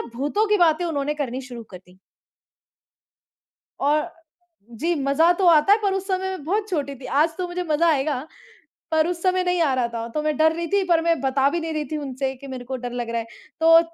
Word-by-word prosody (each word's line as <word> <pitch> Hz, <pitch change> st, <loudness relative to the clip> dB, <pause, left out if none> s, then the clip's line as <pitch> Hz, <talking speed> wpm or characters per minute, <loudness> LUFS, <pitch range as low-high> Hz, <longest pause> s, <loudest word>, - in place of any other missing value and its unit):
भूतों 295 Hz, -, 0 dB
की 420 Hz, -, +4 dB
बातें 345 Hz, 0 st, +3 dB
उन्होंने 295 Hz, -2 st, -1 dB
करनी 265 Hz, -3 st, -3 dB
शुरू 245 Hz, -3 st, -9 dB
कर 185 Hz, -, -9 dB
दी। 180 Hz, +1 st, -20 dB, 1.8 s
और 300 Hz, +4 st, +1 dB, 0.6 s
जी, 320 Hz, +10 st, -1 dB
मज़ा 300 Hz, +6 st, +4 dB
तो 365 Hz, +1 st, 0 dB
आता 320 Hz, +3 st, +5 dB
है 420 Hz, -, +5 dB
पर 395 Hz, -1 st, +1 dB
उस 390 Hz, 0 st, -3 dB
समय 375 Hz, -1 st, +1 dB
मैं 375 Hz, -6 st, -6 dB
बहुत 415 Hz, +6 st, -1 dB
छोटी 285 Hz, -6 st, -2 dB
थी। 255 Hz, -, -10 dB
आज 315 Hz, +4 st, +1 dB
तो 365 Hz, -, -1 dB
मुझे 360 Hz, +1 st, -3 dB
मज़ा 325 Hz, +1 st, +2 dB
आएगा, 290 Hz, -2 st, 0 dB, 0.7 s
पर 315 Hz, 0 st, +3 dB
उस 345 Hz, -1 st, -4 dB
समय 370 Hz, -1 st, +2 dB
नहीं 360 Hz, -1 st, +1 dB
आ 285 Hz, -, +2 dB
रहा 250 Hz, -2 st, 0 dB
था। 230 Hz, -1 st, -5 dB
तो 305 Hz, -, -1 dB
मैं 305 Hz, -1 st, 0 dB
डर 315 Hz, 0 st, +4 dB
रही 340 Hz, 0 st, -3 dB
थी 400 Hz, -1 st, +3 dB
पर 335 Hz, -2 st, +4 dB
मैं 335 Hz, -1 st, +1 dB
बता 270 Hz, 0 st, +2 dB
भी 340 Hz, +3 st, -2 dB
नहीं 325 Hz, 0 st, -4 dB
रही 305 Hz, -1 st, -2 dB
थी -, -, -1 dB
उनसे 265 Hz, -1 st, -3 dB
कि 275 Hz, +2 st, -12 dB
मेरे 255 Hz, -2 st, -7 dB
को 260 Hz, +1 st, -4 dB
डर 245 Hz, -1 st, -6 dB
लग 240 Hz, -1 st, -4 dB
रहा 235 Hz, 0 st, -1 dB
है। 225 Hz, -, -7 dB, 0.3 s
तो 330 Hz, 0 st, +7 dB
305 Hz, 235 wpm, -23 LUFS, 265-345 Hz, 1.8 s, तो